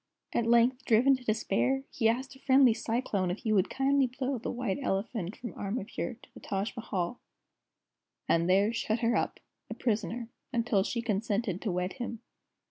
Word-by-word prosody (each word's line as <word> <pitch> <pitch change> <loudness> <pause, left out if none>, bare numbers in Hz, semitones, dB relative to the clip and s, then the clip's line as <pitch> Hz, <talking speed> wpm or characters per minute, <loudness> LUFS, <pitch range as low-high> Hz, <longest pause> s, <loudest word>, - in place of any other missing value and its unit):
At 230 - +1
length, 240 +2 +4
driven 250 +5 +5
to 255 - -14
despair, 250 +4 +1
he 225 -2 +2
asked 260 +4 -2
a - - -16
friendly 265 -3 +5
Cyclone 220 -5 -1
if 180 - -2
he 220 - +1
would 190 -3 +3
kindly 270 0 +2
blow 255 +1 -3
the - - -4
White 245 -2 -2
Elephant 195 -3 -2
from 240 - -7
Amrapure 225 +3 -4
to - - -16
the - - -11
Taj 195 +4 -3
Mahal, 215 -3 -3 1.1
and 170 +1 +2
there 200 +4 +4
shut 225 0 -1
her 235 0 +2
up, - - -1 0.3
a - - -5
prisoner, 225 0 -1 0.2
until 230 -5 +2
she 235 +4 -2
consented 210 -2 -1
to 210 - -1
wed 180 +1 -1
him. 240 -3 -5
230 Hz, 175 wpm, -30 LUFS, 200-250 Hz, 1.1 s, driven